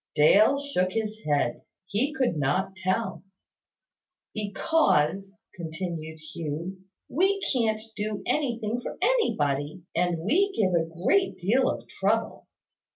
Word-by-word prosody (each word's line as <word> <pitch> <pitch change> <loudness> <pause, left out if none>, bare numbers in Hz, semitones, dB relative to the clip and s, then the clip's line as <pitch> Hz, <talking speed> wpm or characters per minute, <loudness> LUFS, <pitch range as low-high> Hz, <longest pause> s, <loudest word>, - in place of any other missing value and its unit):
Dale 205 - +6
shook 185 -11 -1
his 215 -1 -2
head. 145 -5 +1 0.2
He 210 +10 0
could 260 - 0
not 185 +7 0
tell. 190 -1 -1 1.1
"Because," 200 - +1 0.2
continued 160 -2 -5 0.2
Hugh, 170 +5 -5 0.2
"we 385 +7 +2
can't 220 -4 +1
do 210 0 -3
anything 240 -5 -1
for - - -6
anybody, 150 - +1
and 175 0 +1
we 325 - +2
give 190 - +1
a 165 -1 +3
great 195 - +1
deal 230 +9 +2
of - - -4
trouble. - - -1
195 Hz, 115 wpm, -27 LUFS, 165-240 Hz, 1.1 s, Dale